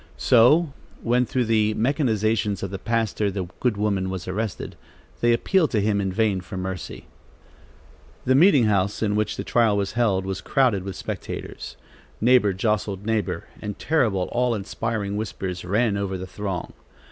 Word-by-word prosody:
So 135 +6 +4 0.3
when, 120 +1 +2
through 125 -2 0
the 110 -1 +2
machinations 110 - 0
of 95 - -4
the 95 - -5
pastor, 110 -2 0
the 95 -1 -3
good 120 -5 0
woman 100 -3 0
was 95 -1 -5
arrested, 105 +2 -4 0.4
they 120 - +3
appealed 160 +8 +2
to 110 - +1
him 100 0 +1
in 95 -1 -1
vain 100 -1 +1
for 95 +1 -8
mercy. 95 -1 -5 1.2
The 130 - +3
meeting 145 -2 +6
house, 100 -1 +1
in 105 -1 +1
which 105 0 -1
the - - -3
trial 115 -4 +2
was 100 -1 -1
held, 105 -5 +1
was 95 -1 -4
crowded 125 -8 +2
with 95 -2 -5
spectators. - - -6 0.4
Neighbor 120 -3 +4
jostled 100 0 -1
neighbor, 110 -3 -1 0.2
and 105 -1 -5
terrible, 115 - +1
awe 125 -1 +1
inspiring 105 0 -3
whispers 95 -4 -4
ran 105 +4 +1
over 100 -1 -2
the 95 - -6
throng. 95 -1 -5
105 Hz, 160 wpm, -24 LUFS, 95-115 Hz, 1.2 s, meeting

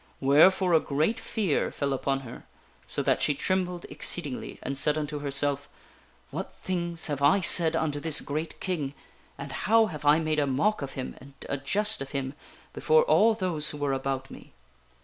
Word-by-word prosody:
Wherefore 175 +7 +5
a 160 - +6
great 155 - 0
fear 215 -7 -1
fell 140 -1 -2
upon 135 0 -1
her 125 -3 -11 0.4
so - - -1
that - - +1
she 145 - +2
trembled 180 +2 -1
exceedingly, 145 -7 -4
and 135 - -3
said 150 +2 +1
unto 150 -1 -3
herself: 145 0 -1 0.3
" - - -32
What - - -5
things 170 -2 -3
have 145 -2 -3
I 145 +8 +5
said 170 -3 +5
unto 155 -3 -1
this 155 0 +1
great 155 +3 -5
King, 150 -7 -3 0.4
and 140 0 -7
how 220 +10 +3
have 155 -8 -7
I 145 +1 +5
made 155 -1 0
a 145 - +1
mock 150 +11 +1
of 140 -1 -5
him 130 -1 -5
and 135 +1 -14
a 140 - -2
jest 210 +10 0
of 135 +1 -7
him 135 -1 -3 0.4
before 470 0 +3
all 225 - +4
those 180 -7 -1
who 150 - -6
were 145 -2 -1
about 135 0 -3
me - - -13
150 Hz, 190 wpm, -27 LUFS, 140-180 Hz, 0.4 s, a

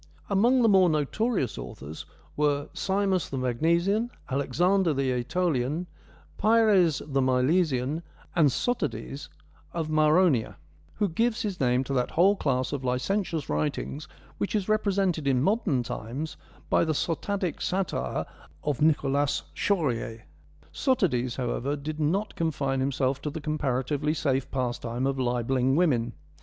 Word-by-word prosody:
Among 240 +6 +4
the - - +5
more 190 -4 +5
notorious 155 - 0
authors 75 +3 -8 0.3
were 145 -1 +1
Simus 195 -2 0
the 135 - -4
Magnesian, 170 - +1 0.2
Alexander 165 +6 +2
the 135 -1 +1
iEtolian, 140 +3 0 0.5
Pyres 210 -7 +4
the 135 -2 0
Milesian, 130 +2 +1 0.3
and 160 -5 +5
Sotades 140 - -2 0.4
of 165 -2 -2
Maronea, 155 -4 +3 0.4
who 205 - +1
gives 225 +7 0
his 200 -4 -3
name 125 0 +2
to 135 - -4
that 125 -2 +1
whole 190 +5 +4
class 130 -6 -1
of 140 -2 -3
licentious 155 +7 -1
writings 150 0 -2 0.3
which 200 - -1
is 205 -3 0
represented 195 -7 +1
in 130 -2 +2
modern 190 - +1
times 130 +8 -5 0.3
by - - +3
the 160 -1 0
sotadic 180 +3 -2
satire 190 0 -1 0.4
of 145 -2 -1
Nicholas 145 -2 +2
Chorier. 120 - -1 0.5
Sotades, 135 - +1
however, 130 +2 -2
did 150 +2 -5
not 190 +8 0
confine 140 -5 -1
himself 135 0 0
to 150 - -3
the 160 +2 -5
comparatively 150 0 -1
safe 135 -4 0
pastime 120 -1 -2
of 135 0 -1
libelling 125 +1 +1
women. 125 -9 +2
150 Hz, 130 wpm, -27 LUFS, 130-185 Hz, 0.5 s, the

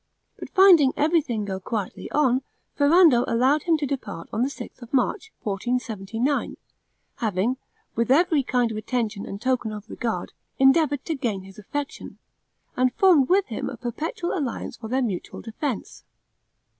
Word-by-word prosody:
But - - -7
finding 355 -8 +6
everything 290 -9 +1
go 190 -1 -4
quietly 205 0 -4
on, 265 -3 +2 0.3
Ferrando 290 -4 +5
allowed 260 +6 +3
him 330 -2 +3
to 295 - -2
depart 255 -11 -5
on 220 - 0
the 260 - +2
sixth 280 - -10
of 240 - -11
March, 405 - 0
1479, 225 +3 -2 0.6
having, 220 +3 0 0.4
with 230 +1 0
every 315 +2 +4
kind 245 -3 0
of 215 - -4
attention 220 -2 -2
and 200 - -6
token 245 -2 0
of 210 0 -8
regard, 225 -6 -4 0.2
endeavored 280 +1 +3
to 325 - -1
gain 230 -10 -2
his 195 +1 -13
affection, 285 +7 -6 0.6
and 255 -1 +1
formed 340 -9 +5
with 385 +2 +4
him 225 - -4
a 255 - -7
perpetual 305 - -3
alliance 280 -9 -3
for 220 - -8
their 260 +3 0
mutual 195 -7 -4
defense. 230 +2 -5
250 Hz, 155 wpm, -24 LUFS, 220-290 Hz, 0.6 s, finding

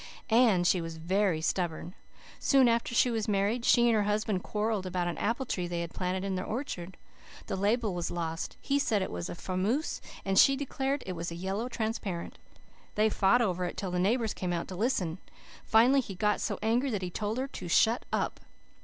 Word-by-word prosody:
" - - -35 0.2
And 180 -5 +2
she 180 0 +3
was 165 -1 -6
very 180 0 +1
stubborn. 175 0 -2 0.5
Soon 270 -3 +4
after 235 0 +1
she 245 - +4
was 225 -2 -1
married 210 +3 +1
she 240 0 +5
and 235 - +4
her 215 - +3
husband 210 -2 0
quarrelled 210 -2 -2
about 180 -1 -1
an 175 - -3
apple 235 +5 0
tree 180 -7 -2
they 170 -1 -2
had 170 -1 -6
planted 185 0 -2
in 195 -1 -2
their 185 0 -2
orchard. 190 -8 -5 0.5
The - - -3
label 210 +2 +1
was 175 -1 -2
lost. 165 -1 -4
He 280 0 0
said 215 -8 +1
it - - -5
was 85 -1 -4
a - - -5
Fameuse 195 - -1 0.2
and 195 -1 +3
she 275 - +7
declared 275 0 -2
it 185 - -4
was 170 0 -4
a 170 - -6
Yellow 195 +7 -3
Transparent. 220 -7 -4 0.6
They 215 +1 +3
fought 215 +6 +4
over 185 -4 -1
it 175 - -4
till 190 -3 -3
the 180 - -1
neighbours 220 +4 +1
came 180 -1 -3
out 170 - -2
to 185 - -6
listen. 185 -6 -1 0.5
Finally 250 +5 +5
he 200 -6 -8
got 210 +3 +1
so - - -2
angry 240 +5 +2
that 205 -6 -2
he 180 - -4
told 210 +4 -2
her 265 +1 -1
to 185 - -7
shut 225 +7 +3
up. - - -1
200 Hz, 215 wpm, -30 LUFS, 180-230 Hz, 0.6 s, she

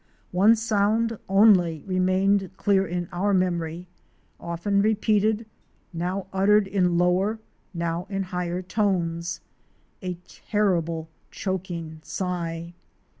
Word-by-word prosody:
One 200 +5 +5
sound 220 +1 +1
only 190 -6 +5
remained 190 +1 +2
clear 195 -1 +2
in 175 0 -3
our 195 +3 +1
memory, 175 -2 -1 0.5
often 170 +4 0
repeated, 215 +1 +2 0.5
now 180 +3 -2
uttered 200 +2 +4
in 185 -3 +1
lower, 185 +5 +2 0.3
now 170 +1 -3
in 195 -1 -2
higher 180 -1 -3
tones 175 -4 -1 0.3
— - - -40
a 180 -2 -3
terrible 170 -6 -1 0.2
choking 175 -4 -4
sigh. 170 -1 -4
185 Hz, 105 wpm, -25 LUFS, 170-200 Hz, 0.5 s, One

